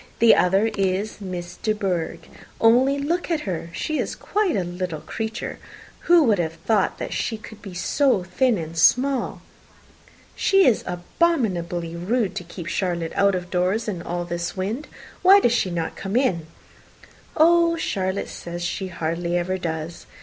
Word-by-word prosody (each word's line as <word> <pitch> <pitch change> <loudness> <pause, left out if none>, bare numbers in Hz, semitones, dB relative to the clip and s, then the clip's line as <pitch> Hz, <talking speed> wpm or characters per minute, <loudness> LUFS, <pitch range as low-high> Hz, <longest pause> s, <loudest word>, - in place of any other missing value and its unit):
The 230 0 +7
other 195 +5 +3
is 195 +2 -1
Miss 180 -2 -6
De 215 - 0
Bourgh. 185 -6 -3 0.3
Only 255 +5 +4
look 335 +6 -1
at 325 -3 0
her. 175 - -4
She 305 - -2
is - - -2
quite 410 -5 0
a 190 - +1
little 175 -3 -4
creature. 225 0 -5 0.5
Who 345 -2 +6
would 215 -8 +3
have 165 -2 -1
thought 215 -4 +2 0.2
she 225 - -2
could 215 0 -12
be 190 -3 -9
so 230 +3 +2
thin 225 +6 +1
and 165 -1 -6
small!" 255 +10 +2 0.9
"She 390 -1 +4
is 235 - +3
abominably 175 - -1
rude 200 +5 0
to - - -4
keep 175 0 -9
Charlotte 170 -2 -2
out 200 -1 +3
of 180 -1 -5
doors 185 +5 0
in 185 -5 -3
all 175 0 -3
this 175 +1 -4
wind. 215 +10 -3 0.3
Why 390 +2 +8
does 240 -11 +2
she 195 - +1
not 170 -2 -3
come 195 +2 -5
in?" 185 - +1 0.9
"Oh, 335 +1 +5
Charlotte 190 - -2
says 175 0 -6
she 190 +2 -3
hardly 170 0 -2
ever 185 +2 -1
does. 160 -1 -5
190 Hz, 160 wpm, -23 LUFS, 175-240 Hz, 0.9 s, Why